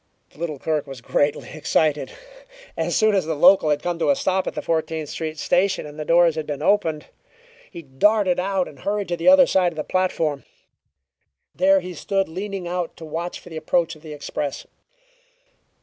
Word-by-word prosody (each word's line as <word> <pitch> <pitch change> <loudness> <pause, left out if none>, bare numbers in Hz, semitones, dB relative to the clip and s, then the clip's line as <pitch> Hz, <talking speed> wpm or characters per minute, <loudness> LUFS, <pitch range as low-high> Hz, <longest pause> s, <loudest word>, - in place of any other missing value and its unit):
The - - -21
little 160 -3 -3
clerk 150 +1 -2
was 135 -2 -8
greatly 145 +4 -1
excited. 155 -1 0 0.6
As - - -1
soon 215 -1 +3
as 190 -5 +1
the 160 - -1
local 175 +1 +5
had 145 -1 0
come 175 -1 -2
to - - +1
a 285 - +4
stop 190 -9 0
at - - -4
the - - -3
Fourteenth 160 -2 -2
Street 160 -1 -5
Station 185 +3 +1
and 150 +1 -10
the - - -2
doors 170 0 +4
had 155 -1 -5
been 145 0 -4
opened, 165 -6 +1 0.6
he 170 - -10
darted 180 +7 +2
out 190 0 0
and 140 - -13
hurried 200 +6 -2
to 175 - 0
the 165 - -3
other 275 -1 +8
side 185 -6 +2
of - - -13
the 155 - -3
platform. 165 -6 -1 1.1
There 190 +1 +4
he 180 0 -7
stood 195 +4 -1
leaning 190 +1 -5
out 175 -1 -3
to 165 - -9
watch 165 +3 -5
for - - -14
the 160 - -7
approach 165 +1 0
of 155 - -18
the 155 -1 -10
express. 145 -1 -5
170 Hz, 195 wpm, -22 LUFS, 155-190 Hz, 1.1 s, other